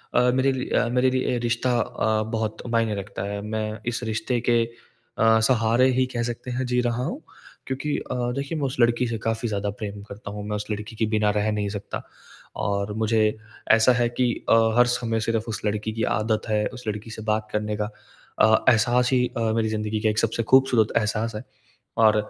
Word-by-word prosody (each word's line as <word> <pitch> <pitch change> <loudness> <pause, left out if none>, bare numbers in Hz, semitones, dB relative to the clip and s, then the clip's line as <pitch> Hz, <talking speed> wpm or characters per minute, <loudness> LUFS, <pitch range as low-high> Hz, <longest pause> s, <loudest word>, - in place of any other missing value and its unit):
अ, - - +6
मेरे 135 +1 +3
रि 130 -1 -3
अ, - - +2
मेरे 125 +1 +3
लिए 130 -1 0
रिश्ता 120 +1 0
अ, 110 -1 0
बहुत 110 -1 -3
मायने 115 -2 +1
रखता 100 0 -5
है। 100 0 -4
मैं 110 0 -3
इस 120 - -3
रिश्ते 120 +2 -1
के 120 -1 +4 0.5
अ, 110 0 +5
सहारे 120 +1 +3
ही 130 - +4
कह 120 - 0
सकते 125 +2 -8
हैं 130 +1 -2
जी 125 - +3
रहा 120 +1 -1
हूँ, - - -4 0.5
क्योंकि 135 +3 -2
अ, 125 - -5 0.2
देखिए 140 +3 -3
मैं 140 - -1
उस 130 - -3
लड़की 120 +1 +3
से 115 -1 -2
काफ़ी 115 +1 -1
ज़्यादा 100 0 -1
प्रेम 100 -1 -5
करता 100 0 -8
हूँ। 105 0 -6
मैं 105 - -1
उस 105 0 -4
लड़की 105 +2 -5
के 110 - +1
बिना 105 -1 +3
रह 110 +1 +1
नहीं 105 -1 -1
सकता। 100 - -6 0.6
और 100 +1 -1
मुझे 110 -1 +2 0.3
ऐसा 115 +3 +6
है 120 -1 +1
कि 120 0 +1 0.2
अ, - - +6 0.2
हर 120 - +7
समय 120 -2 0
सिर्फ़ 115 0 -1
उस 110 - -3
लड़की 105 +1 -1
की 115 - -2 0.2
आदत 110 +1 -1
है। 105 0 +1
उस 125 - -9
लड़की 105 +1 -4
से 110 - -7
बात 110 0 -1
करने 105 0 -1
का 105 0 -2 0.5
अ, 110 0 +5
एहसास 120 +1 +3
ही 125 -1 +3
अ, - - -1
मेरी 110 -1 +1
ज़िंदगी 110 0 -2
का 110 - +2
एक 105 - 0
सबसे 115 +1 0
खूबसूरत 130 -5 +5
एहसास 110 +1 -1
है। 110 - -5 0.6
और 110 - +6
110 Hz, 210 wpm, -24 LUFS, 105-120 Hz, 0.6 s, हर